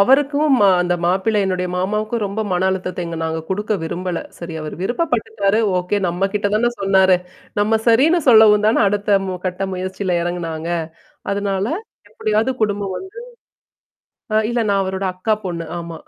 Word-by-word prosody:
அவருக்கும் 285 +5 +4
மா 200 - +6
அந்த 175 0 0
மாப்பிள்ளைன்னுடைய 190 0 +1
மாமாவுக்கும் 215 +4 -1
ரொம்ப 200 +3 -4
மன 180 +1 +1
அழுத்த 185 -1 -3
எங்க 170 0 -5
நாங்க 160 0 -2
குடுக்க 210 +3 -2
விரும்பல. 175 +2 -3 0.2
சரி 170 -1 -7
அவரு 155 0 -6
விருப்பப்பட்டுட்டாரு, 220 - 0 0.2
ஓகே 180 +3 -1
நம்ம 180 +3 0
கிட்ட 205 0 +1
தானே 240 +3 +2
சொன்னாரு. 190 -1 +4 0.4
நம்ம 220 +2 +2
சரின்னு 285 +10 +4
சொல்லவும் 215 -3 +7
தான 220 - +3
அடுத்த, 205 0 +2
மு 185 - -3
கட்ட 185 +1 -2
முயற்சியில 185 0 -2
இறங்குனாங்க. 170 -2 -3 0.6
அதனால 200 -1 -1 0.4
எப்டியாவது 215 +4 0
குடும்பம் 205 -2 -1
வந்து 380 - -8 1.2
ஆ. - - +4
இல்ல 240 0 0
நான் 200 -1 +2
அவரோட 190 +1 -3
அக்கா 215 +4 0
பொண்ணு. 170 -2 -4
ஆமா. 170 -1 -7
195 Hz, 150 wpm, -19 LUFS, 180-215 Hz, 1.2 s, சொல்லவும்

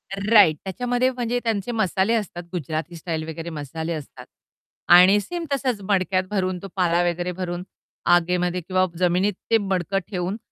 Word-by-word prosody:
Right 200 -5 +5
त्याच्यामध्ये 245 +6 0
म्हणजे 245 -1 -2
त्यांचे 225 0 -1
मसाले 215 -1 +1
असतात, 190 -5 -3
गुजराती 160 0 -4
स्टाईल 160 -1 -4
वगैरे 165 +1 -6
मसाले 160 +2 -5
असतात. 150 -3 -8 0.6
आणि 180 +4 +7
सेम 340 - -5
तसंच 255 -6 -1
मडक्यात 185 -1 +2
भरून, 185 -3 -1
तो 195 - -7
पाला 175 -2 +2
वगैरे 175 +1 -3
भरून 180 -1 -4 0.5
आगेमध्ये 180 +1 0
किंवा 185 +2 +1
जमिनीत 180 +3 +2 0.2
ते 225 - +6
मडकं 195 -2 -1
ठेवून, 185 +2 -2
185 Hz, 150 wpm, -23 LUFS, 175-205 Hz, 0.6 s, आणि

